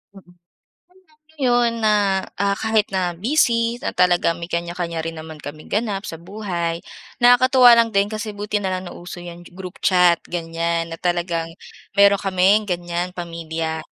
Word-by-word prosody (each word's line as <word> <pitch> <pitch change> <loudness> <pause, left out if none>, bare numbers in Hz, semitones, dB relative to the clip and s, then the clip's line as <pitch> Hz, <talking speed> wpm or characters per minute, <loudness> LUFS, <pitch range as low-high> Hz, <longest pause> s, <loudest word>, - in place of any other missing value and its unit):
Mm, 180 -2 -16 1.0
kaya 285 -5 -2
ngayon 240 -1 +2
na, 215 -1 +4 0.5
ah, 200 0 +1
kahit 220 -1 +1
na 180 -2 -1
busy 235 - +1
na - - -3
talagang 175 -2 +3
may 170 +1 -7
kanya-kanya 170 -1 -3
rin 165 0 -4
naman 155 -1 -9
kaming 150 +1 -10
ganap 205 -2 -1
sa 165 - -7
buhay, 175 -3 -4 0.4
nakakatuwa 245 0 +6
lang 230 0 +3
din 200 +2 +2
kasi 215 -1 -5
buti 210 0 -2
na 190 -2 -2
lang 185 0 -3
nauso 175 0 -9
yan 175 0 -10
group 185 -1 -9
chat, 180 -2 +4
ganyan. 165 0 -2
Na 165 - -6
talagang 175 -2 -1 0.5
mayron 200 0 +5
kaming 195 +2 +2
ganyan, 175 0 -3
pamilya. 165 -2 -4
180 Hz, 155 wpm, -21 LUFS, 170-210 Hz, 1.0 s, nakakatuwa